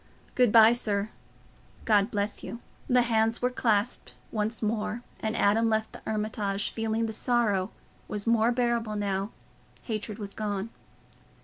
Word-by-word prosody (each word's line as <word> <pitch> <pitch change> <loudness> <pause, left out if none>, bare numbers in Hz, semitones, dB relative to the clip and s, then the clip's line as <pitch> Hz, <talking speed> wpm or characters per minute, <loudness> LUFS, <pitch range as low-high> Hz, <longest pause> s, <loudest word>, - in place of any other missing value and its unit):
"Good 250 -4 +3
bye, 225 0 +8
sir. 210 -3 -1 0.7
God 205 -1 +3
bless 205 -1 -3
you." 235 - -6 0.3
The 250 -1 +4
hands 225 -1 +1
were 250 0 0
clasped 225 -2 0 0.2
once 220 +1 -2
more, 215 +2 -2 0.2
and 220 +1 -2
Adam 225 +3 +3
left 220 0 0
the - - -11
Hermitage, 210 -2 -1
feeling 225 0 -1
that 220 - -3
sorrow 215 -5 +2 0.4
was 205 -1 -2
more 230 0 +3
bearable 235 -3 0
now 200 -1 -1 0.5
hatred 215 -2 -4
was 200 -2 -6
gone. 210 0 -3
220 Hz, 140 wpm, -28 LUFS, 205-230 Hz, 0.7 s, bye